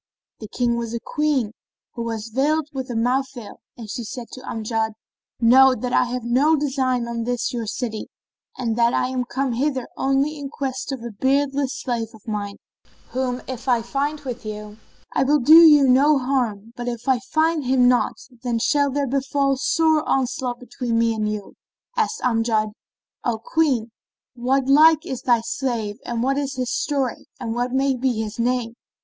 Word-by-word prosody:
the 215 Hz, -, -7 dB
King 235 Hz, +1 st, 0 dB
was 235 Hz, -1 st, -3 dB
a -, -, -2 dB
Queen, 290 Hz, -6 st, 0 dB, 0.4 s
who 235 Hz, -, -5 dB
was 225 Hz, -1 st, -4 dB
veiled 295 Hz, +6 st, +1 dB
with 265 Hz, -1 st, -4 dB
a 240 Hz, -, -4 dB
mouth 250 Hz, +4 st, +1 dB
veil, 220 Hz, -4 st, -10 dB, 0.2 s
and 230 Hz, -3 st, -8 dB
she 235 Hz, +3 st, -5 dB
said 240 Hz, +1 st, -7 dB
to 255 Hz, -, -9 dB
Amjad, 220 Hz, -2 st, -2 dB, 0.5 s
"Know 255 Hz, +3 st, +6 dB
that 250 Hz, 0 st, -4 dB
I -, -, +4 dB
have 250 Hz, 0 st, -4 dB
no 265 Hz, +7 st, +3 dB
design 260 Hz, -4 st, 0 dB
on 235 Hz, -1 st, -3 dB
this 245 Hz, 0 st, -2 dB
your 230 Hz, -2 st, -3 dB
city 220 Hz, -1 st, -4 dB, 0.5 s
and 230 Hz, -3 st, -1 dB
that 235 Hz, 0 st, +3 dB
I 255 Hz, -, +1 dB
am 255 Hz, -1 st, -2 dB
come 265 Hz, +1 st, -2 dB
hither 260 Hz, 0 st, -1 dB
only 275 Hz, +3 st, 0 dB
in 280 Hz, -1 st, -5 dB
quest 265 Hz, -1 st, -4 dB
of 260 Hz, -4 st, -5 dB
a 235 Hz, -, -5 dB
beardless 275 Hz, +4 st, 0 dB
slave 235 Hz, -3 st, -2 dB
of 215 Hz, -, -19 dB
mine, 205 Hz, -2 st, -3 dB, 0.6 s
whom 255 Hz, -1 st, -2 dB
if 260 Hz, 0 st, -7 dB
I 240 Hz, -3 st, +2 dB
find 285 Hz, +5 st, -2 dB
with 250 Hz, -4 st, -6 dB
you, 210 Hz, 0 st, -7 dB, 0.3 s
I -, -, +2 dB
will 290 Hz, +3 st, +4 dB
do 310 Hz, +5 st, +8 dB
you 295 Hz, -4 st, +7 dB
no 280 Hz, +4 st, +5 dB
harm, 240 Hz, -5 st, -1 dB
but 245 Hz, 0 st, -6 dB
if 240 Hz, +1 st, -5 dB
I 260 Hz, -2 st, +3 dB
find 315 Hz, +4 st, 0 dB
him 250 Hz, -1 st, +4 dB
not, 250 Hz, -1 st, +2 dB, 0.3 s
then 245 Hz, -2 st, -1 dB
shall 285 Hz, +5 st, +2 dB
there 285 Hz, +1 st, -1 dB
befall 275 Hz, +1 st, 0 dB
sore 315 Hz, +3 st, +2 dB
onslaught 255 Hz, -2 st, -1 dB
between 245 Hz, -1 st, -3 dB
me 230 Hz, 0 st, +2 dB
and 215 Hz, -1 st, -1 dB
you." 210 Hz, -2 st, -6 dB, 0.4 s
Asked 445 Hz, -1 st, 0 dB
Amjad, 225 Hz, -3 st, +1 dB, 0.5 s
"O 235 Hz, -2 st, 0 dB
Queen, 245 Hz, -3 st, 0 dB, 0.4 s
what 255 Hz, +2 st, 0 dB
like 310 Hz, +3 st, +6 dB
is 260 Hz, -, -4 dB
thy 240 Hz, -2 st, +3 dB
slave 230 Hz, -4 st, -3 dB
and 235 Hz, -1 st, -1 dB
what 275 Hz, +2 st, +1 dB
is 280 Hz, -1 st, -3 dB
his 250 Hz, -1 st, -2 dB
story 275 Hz, -5 st, -2 dB
and 230 Hz, -3 st, -3 dB
what 245 Hz, +1 st, -1 dB
may 270 Hz, +1 st, +1 dB
be 255 Hz, 0 st, 0 dB
his 220 Hz, 0 st, -4 dB
name?" 240 Hz, -1 st, 0 dB
250 Hz, 185 wpm, -22 LUFS, 230-275 Hz, 0.6 s, do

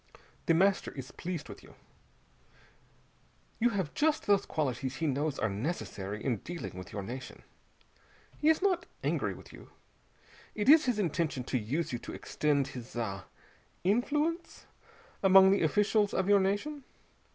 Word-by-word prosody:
The 165 Hz, -, +5 dB
Master 195 Hz, +3 st, +2 dB
is 130 Hz, -2 st, -8 dB
pleased 170 Hz, -4 st, -5 dB
with -, -, -10 dB
you. -, -, -17 dB, 1.8 s
You 240 Hz, +1 st, +4 dB
have 190 Hz, -9 st, -2 dB
just 310 Hz, 0 st, +1 dB
those 200 Hz, -1 st, +3 dB
qualities 130 Hz, -3 st, -2 dB
he 160 Hz, -, -2 dB
knows 145 Hz, 0 st, 0 dB
are 110 Hz, -, +1 dB
necessary 105 Hz, -, -4 dB
in 125 Hz, -5 st, +1 dB
dealing 170 Hz, -, -7 dB
with 90 Hz, -1 st, -8 dB
your 100 Hz, -1 st, -4 dB
nation. 125 Hz, +5 st, -8 dB, 1.0 s
He 305 Hz, -, +3 dB
is 320 Hz, +3 st, +3 dB
not 365 Hz, -3 st, +1 dB, 0.2 s
angry -, -, 0 dB
with -, -, -14 dB
you. -, -, -13 dB, 0.9 s
It 210 Hz, +1 st, -2 dB
is 310 Hz, 0 st, +8 dB
his 250 Hz, -4 st, +1 dB
intention 165 Hz, -8 st, -1 dB
to 125 Hz, -, -1 dB
use 135 Hz, +8 st, -2 dB
you 120 Hz, -, -2 dB
to -, -, -8 dB
extend 140 Hz, -2 st, 0 dB
his 125 Hz, -3 st, -9 dB
ah 100 Hz, -5 st, -3 dB, 0.6 s
influence 295 Hz, -, 0 dB, 0.6 s
among 190 Hz, 0 st, +7 dB
the 200 Hz, -, +3 dB
officials 205 Hz, +5 st, +2 dB
of 190 Hz, -, +1 dB
your 205 Hz, 0 st, +6 dB
nation. 205 Hz, +10 st, -1 dB
170 Hz, 150 wpm, -31 LUFS, 130-210 Hz, 1.8 s, is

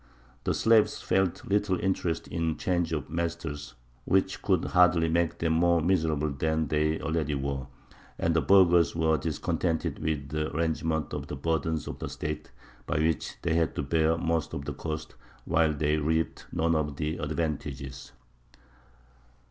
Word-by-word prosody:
The -, -, +1 dB
slaves 110 Hz, -1 st, +4 dB
felt 95 Hz, -2 st, 0 dB
little 100 Hz, -2 st, +1 dB
interest 90 Hz, -3 st, -1 dB
in 85 Hz, -1 st, -1 dB
a -, -, 0 dB
change 85 Hz, -2 st, 0 dB
of 75 Hz, -3 st, -2 dB
masters, 80 Hz, -5 st, -4 dB, 0.3 s
which 95 Hz, +7 st, +1 dB
could -, -, +1 dB
hardly 90 Hz, -2 st, +4 dB
make 85 Hz, 0 st, +1 dB
them 80 Hz, -1 st, +1 dB
more 85 Hz, +1 st, +4 dB
miserable 80 Hz, -3 st, +1 dB
than 80 Hz, +2 st, 0 dB
they 75 Hz, +1 st, +1 dB
already 80 Hz, -2 st, -1 dB
were; 70 Hz, -1 st, -3 dB, 0.5 s
and 85 Hz, 0 st, +1 dB
the 80 Hz, -, +4 dB
burghers 85 Hz, -2 st, +5 dB
were 80 Hz, -1 st, +2 dB
discontented 80 Hz, +1 st, -1 dB
with 75 Hz, -3 st, -2 dB
the 75 Hz, +1 st, -2 dB
arrangement 80 Hz, -1 st, -1 dB
of -, -, -4 dB
the -, -, -5 dB
burdens 80 Hz, +2 st, -1 dB
of -, -, -6 dB
the -, -, -4 dB
State, 75 Hz, 0 st, -5 dB, 0.4 s
by -, -, 0 dB
which 80 Hz, -1 st, 0 dB
they 85 Hz, -, +1 dB
had 80 Hz, -1 st, +1 dB
to -, -, -1 dB
bear 80 Hz, +3 st, +2 dB
most 80 Hz, -2 st, -1 dB
of 70 Hz, -, -5 dB
the -, -, -3 dB
cost 80 Hz, -1 st, -5 dB, 0.3 s
while 80 Hz, -1 st, +3 dB
they 75 Hz, +1 st, +1 dB
reaped 80 Hz, +2 st, -1 dB
none 80 Hz, +1 st, +1 dB
of 75 Hz, -2 st, -1 dB
the 75 Hz, +3 st, -2 dB
advantages. 75 Hz, -3 st, -4 dB
80 Hz, 160 wpm, -28 LUFS, 75-85 Hz, 0.5 s, burghers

